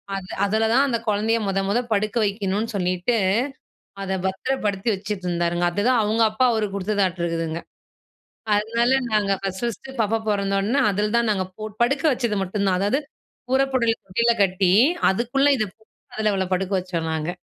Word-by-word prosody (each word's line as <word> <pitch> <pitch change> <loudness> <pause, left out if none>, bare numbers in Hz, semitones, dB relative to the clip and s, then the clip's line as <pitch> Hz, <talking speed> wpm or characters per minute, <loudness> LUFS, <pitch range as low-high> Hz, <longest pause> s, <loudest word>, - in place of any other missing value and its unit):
அது 190 -1 -6 0.2
அதுல 220 +2 +1
தான் 270 +3 +4
அந்த 240 -3 0
குழந்தைய 215 +2 +1
மொத, 195 0 0
மொத 215 +4 +2
படுக்க 215 +2 0
வைக்கணும்ன்னு 205 +2 -2
சொல்லிட்டு, 180 +4 0 0.9
அத 190 0 -2
பத்திரப்படுத்தி 205 +1 -1
வைச்சுட்டு 195 -1 -5
இருந்தாருங்க! 175 0 0
அதுதான், 230 +7 +2
அவங்க 220 +2 +2
அப்பா 220 +4 +2
அவருக்கு 210 -3 -1
குடுத்ததாட்டு 190 -3 0
இருக்குதுங்க. 165 -1 -2 0.9
அதனால, 230 +4 +1 0.2
நாங்க 210 -2 +2
ஃபர்ஸ்ட், 190 -1 -3
ஃபர்ஸ்ட்டு 250 +3 -5
பாப்பா 225 +1 +1
பொறந்தோன, 200 +6 +1
அதில 210 +2 -1
தான் 235 -1 +1
நாங்க 190 -2 -1 0.4
படுக்க 275 +5 +1
வச்சது 235 -5 -1
மட்டுந்தான். 190 -1 0
அதாது, 205 +7 +1 0.5
புறப்படல் 260 -4 +2 0.2
கீழ 235 0 +4
கட்டி, 185 -1 +2 0.4
அதுக்குள்ள 245 +7 +1
இத 215 - 0 0.7
அவள 190 -1 0
படுக்க 190 +1 -3
வச்சோம் 170 -3 -3
நாங்க. 160 +1 -2
205 Hz, 145 wpm, -23 LUFS, 190-230 Hz, 0.9 s, தான்